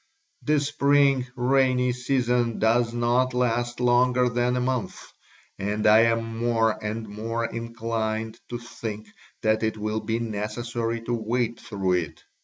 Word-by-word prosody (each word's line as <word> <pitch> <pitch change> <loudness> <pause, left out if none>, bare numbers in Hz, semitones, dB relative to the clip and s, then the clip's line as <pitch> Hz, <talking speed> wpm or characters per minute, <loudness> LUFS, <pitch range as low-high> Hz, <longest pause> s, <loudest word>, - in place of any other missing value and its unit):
The 150 0 +2
spring 140 -2 +2
rainy 125 0 +2
season 125 -2 0
does 115 +1 +2
not 120 +2 +1
last 120 -1 0
longer 125 0 +3
than 120 +1 0
a - - 0
month 125 -2 -2 0.6
and 105 +2 -2
I 105 +1 +7
am 115 0 -1
more 115 -2 +1
and 110 +1 -4
more 115 +3 -3
inclined 115 -1 -3
to 120 - -3
think 110 -3 -7 0.3
that 110 0 +2
it 110 -1 -1
will 110 +1 -2
be 110 +1 -2
necessary 115 +1 -3
to 120 +1 -3
wait 115 +1 -1
through 95 -2 -2
it. 85 -4 -2
115 Hz, 140 wpm, -25 LUFS, 110-125 Hz, 0.6 s, I